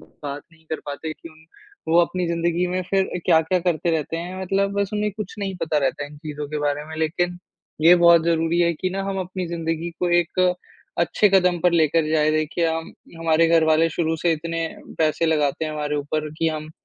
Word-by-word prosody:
बात 145 -1 -8
नहीं 160 -1 -23
कर 160 - -3
पाते 155 +2 -5
किन 165 +1 -13
उन 160 0 -21 0.5
वो 170 - +7
अपनी 180 +1 0
ज़िंदगी 170 +1 0
में 185 +1 -1
फिर 195 -1 +3 0.2
क्या-क्या 165 +1 +3
करते 175 -1 0
रहते 160 0 -2
हैं 180 +3 -5
मतलब 195 +2 0
बस 200 -1 -1
उन्हें 210 0 0
कुछ 210 -3 -6
नहीं 195 -1 -3
पता 155 -2 +1
रहता 140 +1 -1
है 145 - -10
इन 150 - -13
चीज़ों 150 -1 -6
के 150 - -3
बारे 145 0 -1
में 160 +1 -9
लेकिन, 175 +3 -1 0.4
ये 170 +2 +8
बहुत 170 -1 +6
ज़रूरी 165 0 +1
है 170 -1 +3
कि 185 +4 -3
ना 195 +1 -3
हम 195 0 -3
अपनी 185 0 -4
ज़िंदगी 165 0 -3
को 180 - +1
एक 175 +1 -1 0.6
अच्छे 175 +4 +3
कदम 180 -2 +3
पर 180 +1 +3
लेकर 160 -1 +2
जाएँ 155 -1 +3
देखिए 155 +2 0
हम 160 0 -4 0.3
हमारे 165 0 +3
घर 165 -1 +4
वाले 160 +1 +3
शुरू 160 0 -1
से 170 +1 +1
इतने 165 +1 -3 0.4
पैसे 160 +1 +2
लगाते 150 -1 +1
हैं 155 - -3
हमारे 150 -1 -2
ऊपर 155 +1 -2
कि 165 - +2
हम 155 0 -5
165 Hz, 215 wpm, -22 LUFS, 155-175 Hz, 0.6 s, ये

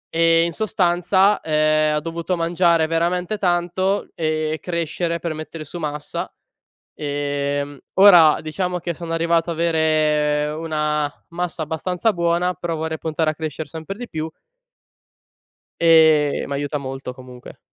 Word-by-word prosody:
e 165 0 +4
in 170 - -1
sostanza, 190 0 +2
ehm, 155 0 +2
ho - - +1
dovuto 165 +3 -3
mangiare 170 -1 +2
veramente 175 +5 -1
tanto, 185 +2 0
e 155 -1 -1
crescere 170 0 -2
per 170 -1 -4
mettere 155 0 -7
su 165 +4 -8
massa. 150 -2 -4 0.6
Ehm, 145 -1 -3 0.2
ora 175 -6 +7
diciamo 180 +3 -3
che 170 0 -4
sono 165 +1 -6
arrivato 165 0 +1
a - - 0
avere 155 -2 +1
una 150 -2 -1 0.2
massa 175 -1 -4
abbastanza 180 +7 -1
buona, 170 +1 +1
però 175 -2 -4
vorrei 160 0 -3
puntare 160 0 -2
a 155 - 0
crescere 155 0 -5
sempre 165 +5 -7
di 245 -1 -7
più 160 0 -4 1.5
ehm, 160 -3 +5
mi 140 - -4
aiuta 145 +1 -2
molto 135 -2 -6
comunque. 125 -1 -13
160 Hz, 135 wpm, -21 LUFS, 150-175 Hz, 1.5 s, ora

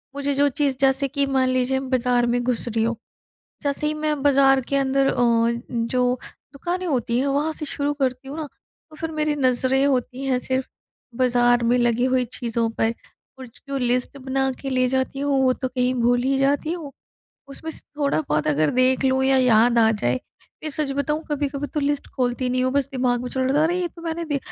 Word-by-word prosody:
मुझे 285 0 -1
जो 285 +1 +4
चीज़ 275 -1 0
जैसे 270 +1 +3
कि 280 +1 0
मान 265 -1 +1
लीजिए 255 +1 +1 0.2
बाज़ार 245 0 +2
में 245 - +1
घुस 245 -1 -1
रही 225 -1 0
हूँ, 230 +1 0 0.7
जैसे 285 +1 -1
ही 305 - 0
मैं 305 -2 -2
बाज़ार 270 -1 +5
के - - +2
अंदर 275 0 +2
अ, - - +1 0.6
जो 250 +1 0 0.3
दुकानें 350 +6 -3
होती 240 -4 0
हैं 280 - 0
वहाँ 290 +3 0
से 305 - -5
शुरू 285 +1 -2
करती 265 -2 -2
हूँ 290 +3 -7
ना, 310 - -4 0.4
तो 310 - -14
फिर 325 +1 -5
मेरी 305 -1 0
नज़रें 260 0 +2
होती 260 -1 -1
हैं 255 -2 +1
सिर्फ़ 260 +1 -2 0.5
बाज़ार 245 -1 +3
में 240 +2 +3
लगी 240 0 +2
हुई 255 -1 +1
चीज़ों 230 -1 -2
पर 225 +1 +2 0.5
और 260 - -8 0.2
जो 275 0 -2
लिस्ट 250 +2 0
बना 265 0 -1
के 270 - -4
ले 255 -1 +2
जाती 265 +1 -1
हूँ 280 -1 +1
वो 255 - +4
तो 260 - -3
कहीं 250 0 0
भूल 245 +1 +2
ही 270 +1 +1
जाती 285 +3 +1
हूँ। 320 -5 -5 0.6
उसमें 320 +3 -7
से - - -5 0.2
थोड़ा-बहुत 280 - 0
अगर 150 +1 +2
देख 260 +1 +3
लूँ 265 0 +2
या 270 0 +4
याद 240 -1 +4
आ 225 -1 +5
जाए, 125 - 0 0.5
या 310 - -3
सच 290 -1 -2
बताऊँ 300 +2 -1
कभी-कभी 290 -1 -2
तो 300 - 0
लिस्ट 285 0 -1
खोलती 250 0 0
नहीं 255 0 0
हूँ 255 - 0
बस 280 -1 +1
दिमाग 250 -2 0
में 250 - -4
चल 260 - -2
रहा 260 +2 +1
था - - +4
अरे 350 +2 +1
ये 350 - -1
तो 335 +1 -15
मैंने 335 0 -3
दे 290 -3 -1
265 Hz, 215 wpm, -23 LUFS, 250-285 Hz, 0.7 s, बाज़ार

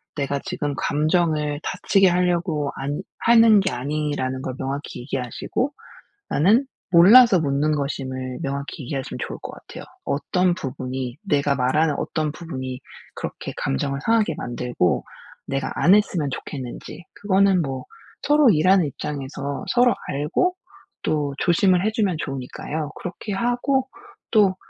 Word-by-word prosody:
내가 140 -1 -1
지금 155 -7 -2
감정을 150 -1 +1
다치게 195 -1 +2
하려고 175 -4 0
안 140 +2 -3 0.2
하는 230 -2 +6
게 190 -1 0
아니라는 140 -1 -2
걸 130 -1 -4
명확히 135 0 -4
얘기하시고 135 - -3 0.6
나는 220 - +3 0.2
몰라서 195 +5 +8
묻는 145 +1 +1
것임을 130 -3 -4
명확히 140 +2 -4
이해하시면 135 +1 -4
좋을 - - -7
것 - - -6
같아요. - - -11 0.2
어떤 180 +5 +1
부분이 130 -3 -5
내가 145 -6 +1
말하는 150 +5 +2
어떤 155 -2 -2
부분이 130 -6 -6 0.3
그렇게 - - -6
감정을 135 - -1
상하게 220 -7 +2
만들고 120 -7 -1 0.4
내가 135 -1 -2
안 180 - +5
했으면 175 -9 +1
좋겠는지 130 +6 -7
그거는 195 -2 +3
뭐 135 -2 -4 0.4
서로 295 -3 +5
일하는 185 0 +4
입장에서 140 0 -5
서로 245 0 +4
알고 150 - 0 0.5
또 145 -2 -1
조심을 180 +1 +3
해 - - +3
주면 205 -7 0
좋으니까요. 140 +3 -4
그렇게 205 +3 -6
하고 245 +5 0 0.4
또 200 -4 +4
150 Hz, 305 characters per minute, -23 LUFS, 135-190 Hz, 0.6 s, 몰라서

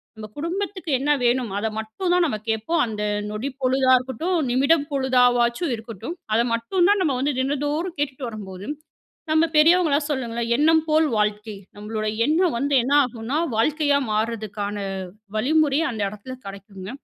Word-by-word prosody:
நம்ம 215 -1 -8
குடும்பத்துக்கு 365 +2 -3
என்ன 290 +2 +1
வேணும் 240 -1 +2
அத 220 - -1
மட்டும் 220 - -3
தான் 360 -1 +4
நம்ம 215 -7 -2
கேட்போம். 220 +10 0
அந்த 210 -1 -5 0.3
நொடி 215 +6 -3
பொழுதா 260 0 +3
இருக்கட்டும், 290 +8 -2
நிமிடம் 280 +4 +3
பொழுதாவாச்சு 250 0 +2
இருக்கட்டும். 230 - -7 0.2
அத 230 - +4
மட்டும் 345 +11 +1
தான் 410 -1 +3
நம்ம 290 -6 +1
வந்து 285 +1 0
தினந்தோறும் 290 +5 -2
கேட்டுட்டு 270 -2 -2
வரும்போது, 200 -2 -8 0.6
நம்ம 315 +1 +4
பெரியவங்களா 320 -2 +5
சொல்லுங்களே, 235 -4 -2
எண்ணம் 320 +1 +4
போல் 310 0 +4
வாழ்க்கை. 210 0 -1 0.2
நம்மளோட 215 +1 -4 0.2
எண்ணம் 330 0 +2
வந்து 280 +1 +1
என்ன 275 +3 0
ஆகும்னா, 245 +3 -4 0.2
வாழ்க்கையா 290 +3 +2
மாற்றதுக்கான 215 -2 -2 0.6
வழிமுறை 290 +4 +2
அந்த 220 -3 -6
எடத்துல 210 +6 -8
கெடைக்குங்க. 195 -1 -9
260 Hz, 145 wpm, -23 LUFS, 220-310 Hz, 0.6 s, பெரியவங்களா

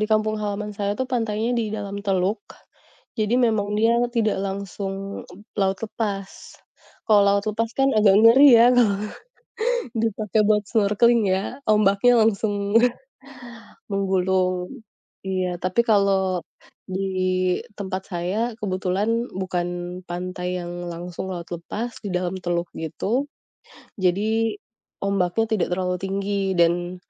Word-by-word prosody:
di 215 - +1
kampung 215 0 +2
halaman 210 0 -3
saya 200 -1 -2
tuh 260 - -1
pantainya 225 -1 0
di 230 -2 0
dalam 200 -1 -5
teluk, 190 +2 +1 0.8
jadi 215 +2 +1
memang 210 -2 0
dia 225 +1 +4 0.2
tidak 225 -3 +1
langsung 195 0 -4 0.7
laut 190 0 +1
lepas. 200 -3 -3 0.8
Kalau 210 -2 +6
laut 200 0 +3
lepas 230 +2 -1
kan, 270 - +4
agak 200 -2 +5
ngeri 255 +6 +8
ya 230 - +7
kalau 210 -5 +3 1.0
dipakai 215 -1 0
buat 210 -1 +3
snorkeling 225 +2 +3
ya, 195 +9 -2
ombaknya 210 +3 +4
langsung 205 -1 0 1.2
menggulung, 190 +2 0 0.4
iya, 185 -2 -1
tapi 185 +5 +1
kalau 195 -4 +2 0.5
di 190 +1 -3 0.8
tempat 190 -1 -4
saya, 175 +3 -2 0.2
kebetulan 205 +4 -1
bukan 175 -1 -3
pantai 180 +1 -4
yang 175 0 -6 0.2
langsung 175 +2 -6
laut 170 -1 -7
lepas 195 +8 -4
di - - -3
dalam 180 +1 -1
teluk 175 -1 -2
gitu, 205 - -2 0.7
jadi 215 +4 +1 0.5
ombaknya 200 +2 +1
tidak 210 -5 +1
terlalu 180 0 -1
tinggi 195 0 -1
dan 175 +1 +2
200 Hz, 120 wpm, -23 LUFS, 185-215 Hz, 1.2 s, ngeri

